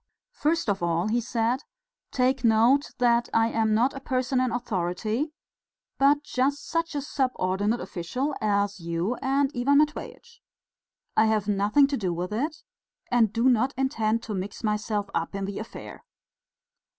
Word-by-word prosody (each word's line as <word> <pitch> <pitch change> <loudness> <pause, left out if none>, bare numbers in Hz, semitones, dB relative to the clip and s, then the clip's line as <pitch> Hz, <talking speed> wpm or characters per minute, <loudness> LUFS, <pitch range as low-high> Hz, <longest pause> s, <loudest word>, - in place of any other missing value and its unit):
"First 330 - 0
of 200 -3 0
all," 170 +3 0
he 240 +2 +1
said, 235 +3 0 0.5
"take 255 0 +1
note 235 +5 +4
that 240 -1 +2
I 225 0 +4
am 220 -1 +1
not 245 +5 +2
a 275 - -6
person 255 -1 0
in 255 -2 0
authority, 220 - -2 0.7
but 285 +2 +4
just 280 0 -1
such 330 -1 -2
a 285 - -1
subordinate 220 -6 0
official 195 - -3
as 200 -2 0
you 170 +5 -2
and 275 0 +1
Ivan 270 +4 +3
Matveitch.... 305 +10 -2 0.7
I 220 - +5
have 215 -2 +1
nothing 205 +7 +4
to 275 0 -1
do 185 -5 -1
with 180 +4 -4
it, 300 +8 -3 0.5
and 230 -4 +4
do 230 +3 +1
not 255 +1 +2
intend 230 -4 0
to 220 - -5
mix 195 +3 -5
myself 210 -1 -1
up 165 +3 -2
in 195 0 -2
the 200 0 -5
affair." 220 - -9
230 Hz, 155 wpm, -26 LUFS, 205-270 Hz, 0.7 s, I